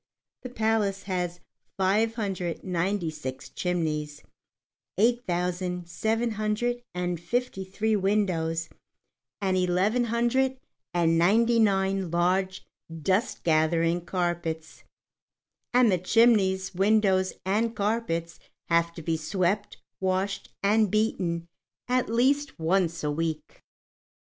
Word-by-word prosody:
The 255 Hz, -, -7 dB
palace 220 Hz, -4 st, 0 dB
has 180 Hz, -2 st, -3 dB, 0.4 s
five 210 Hz, +4 st, +2 dB
hundred 190 Hz, -6 st, -3 dB
and 185 Hz, -, -5 dB
ninety 175 Hz, -1 st, 0 dB
six 135 Hz, -4 st, -7 dB
chimneys, 155 Hz, -4 st, -2 dB, 0.7 s
eight 240 Hz, +3 st, +2 dB
thousand, 180 Hz, 0 st, -2 dB
seven 225 Hz, +6 st, -1 dB
hundred 215 Hz, +3 st, -1 dB
and 180 Hz, -1 st, -2 dB
fifty 215 Hz, +3 st, -2 dB
three 215 Hz, +3 st, -1 dB
windows, 180 Hz, -5 st, 0 dB, 0.7 s
and 190 Hz, -2 st, +1 dB
eleven 185 Hz, +7 st, +2 dB
hundred 240 Hz, +3 st, +1 dB, 0.3 s
and 165 Hz, -1 st, +2 dB
ninety 230 Hz, +7 st, +4 dB
nine 195 Hz, -3 st, +2 dB
large 185 Hz, +3 st, 0 dB, 0.3 s
dust 185 Hz, -, -1 dB
gathering 165 Hz, +1 st, +2 dB
carpets, 175 Hz, -3 st, -3 dB, 0.9 s
and 245 Hz, -3 st, +5 dB
the 180 Hz, -, +2 dB
chimneys, 190 Hz, -2 st, +3 dB
windows, 195 Hz, -1 st, +2 dB
and 220 Hz, +4 st, 0 dB
carpets 200 Hz, -6 st, -2 dB, 0.3 s
have 170 Hz, 0 st, +3 dB
to 165 Hz, -, -8 dB
be 165 Hz, 0 st, 0 dB
swept, 185 Hz, +6 st, -1 dB, 0.2 s
washed, 190 Hz, +1 st, -1 dB
and 210 Hz, +1 st, +3 dB
beaten 180 Hz, -5 st, 0 dB, 0.4 s
at 250 Hz, -2 st, +1 dB
least 275 Hz, +5 st, +1 dB
once 170 Hz, 0 st, 0 dB
a 150 Hz, -, 0 dB
week. 160 Hz, 0 st, -4 dB
190 Hz, 110 wpm, -27 LUFS, 170-220 Hz, 0.9 s, and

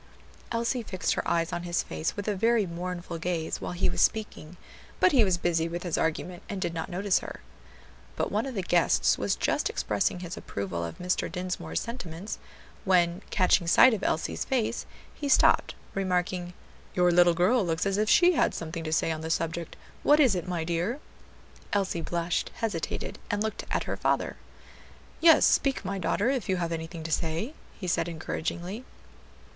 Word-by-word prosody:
Elsie 235 Hz, +2 st, 0 dB
fixed 190 Hz, -4 st, -1 dB
her -, -, -2 dB
eyes 165 Hz, 0 st, +1 dB
on 175 Hz, -, -2 dB
his 175 Hz, 0 st, -1 dB
face 80 Hz, 0 st, -3 dB
with 205 Hz, -, -4 dB
a 210 Hz, -, +2 dB
very 225 Hz, +1 st, +3 dB
mournful 175 Hz, 0 st, -5 dB
gaze 165 Hz, -1 st, -2 dB
while 90 Hz, -1 st, -4 dB
he 95 Hz, +2 st, +1 dB
was 90 Hz, -1 st, 0 dB
speaking, 180 Hz, -6 st, 0 dB, 0.4 s
but 365 Hz, -, +5 dB
he 260 Hz, -6 st, +5 dB
was 185 Hz, -3 st, +2 dB
busy 165 Hz, -1 st, 0 dB
with 175 Hz, +1 st, -4 dB
his 175 Hz, -3 st, -1 dB
argument 175 Hz, +2 st, -2 dB
and 200 Hz, -, -3 dB
did 175 Hz, -3 st, -2 dB
not 165 Hz, +1 st, -4 dB
notice 195 Hz, +2 st, +1 dB
her. -, -, -8 dB, 0.8 s
But -, -, -1 dB
one 215 Hz, +6 st, 0 dB
of 260 Hz, -, -6 dB
the 195 Hz, -, -1 dB
guests 165 Hz, -, +3 dB
was -, -, +1 dB
just -, -, 0 dB
expressing 105 Hz, -, -1 dB
his 175 Hz, -1 st, -5 dB
approval 95 Hz, -4 st, -4 dB
of 85 Hz, -1 st, -6 dB
Mr. 180 Hz, 0 st, -1 dB
Dinsmore's 185 Hz, 0 st, -3 dB
sentiments, 200 Hz, -5 st, -6 dB, 0.4 s
when 180 Hz, -2 st, +3 dB
catching 180 Hz, -2 st, +3 dB
sight 255 Hz, +8 st, +7 dB
of 215 Hz, -, -2 dB
Elsie's 160 Hz, -, -1 dB
face, 250 Hz, -5 st, -1 dB, 0.3 s
he 285 Hz, -, -4 dB
stopped, -, -, +4 dB, 0.2 s
remarking, 180 Hz, -2 st, -1 dB, 0.4 s
"Your 180 Hz, -1 st, +4 dB
little 175 Hz, 0 st, +5 dB
girl 210 Hz, +7 st, +3 dB
looks 165 Hz, 0 st, -1 dB
as 195 Hz, 0 st, +1 dB
if 215 Hz, 0 st, +1 dB
she 355 Hz, 0 st, +6 dB
had 345 Hz, -, +2 dB
something 165 Hz, 0 st, -5 dB
to 155 Hz, -, -4 dB
say 160 Hz, +1 st, +2 dB
on 155 Hz, -1 st, -3 dB
the 160 Hz, -, -4 dB
subject; 165 Hz, 0 st, -2 dB, 0.3 s
what 295 Hz, +1 st, +5 dB
is 260 Hz, -8 st, +5 dB
it, 180 Hz, -1 st, -3 dB
my 175 Hz, -3 st, -2 dB
dear?" 175 Hz, -, -1 dB, 0.7 s
Elsie 195 Hz, -4 st, 0 dB
blushed, 170 Hz, +1 st, -1 dB
hesitated, 205 Hz, -8 st, -3 dB
and 205 Hz, +1 st, 0 dB
looked 220 Hz, -1 st, -3 dB
at -, -, 0 dB
her -, -, -4 dB
father. -, -, 0 dB, 0.8 s
"Yes, 325 Hz, -1 st, +7 dB
speak, 270 Hz, -6 st, +2 dB
my 195 Hz, 0 st, -2 dB
daughter, 205 Hz, +7 st, +1 dB
if 250 Hz, -9 st, -2 dB
you 185 Hz, -, +2 dB
have 170 Hz, -1 st, -2 dB
anything 160 Hz, 0 st, -5 dB
to 160 Hz, -, -5 dB
say," 165 Hz, -, -1 dB, 0.3 s
he 185 Hz, -, -5 dB
said 170 Hz, -1 st, +1 dB
encouragingly. 170 Hz, +6 st, -4 dB
180 Hz, 185 wpm, -28 LUFS, 165-205 Hz, 0.8 s, sight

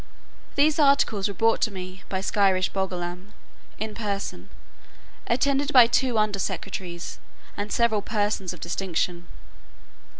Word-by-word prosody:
These 300 Hz, +2 st, +3 dB
articles 275 Hz, -8 st, +3 dB
were 200 Hz, -, -4 dB
brought 225 Hz, +4 st, +2 dB
to -, -, +3 dB
me 185 Hz, -1 st, -8 dB
by 190 Hz, -1 st, -2 dB
Skyresh 195 Hz, -2 st, +2 dB
Bolgolam 185 Hz, 0 st, -4 dB, 0.4 s
in 220 Hz, 0 st, -4 dB
person 205 Hz, -3 st, -4 dB, 0.8 s
attended 280 Hz, +4 st, +1 dB
by 250 Hz, -4 st, +9 dB
two 240 Hz, 0 st, +1 dB
under 215 Hz, -2 st, +1 dB
secretaries, 175 Hz, -2 st, -4 dB, 0.4 s
and 205 Hz, +1 st, -4 dB
several 230 Hz, -3 st, +2 dB
persons 205 Hz, -3 st, -1 dB
of 180 Hz, -, -9 dB
distinction. 175 Hz, -1 st, -2 dB
205 Hz, 125 wpm, -25 LUFS, 185-230 Hz, 0.8 s, by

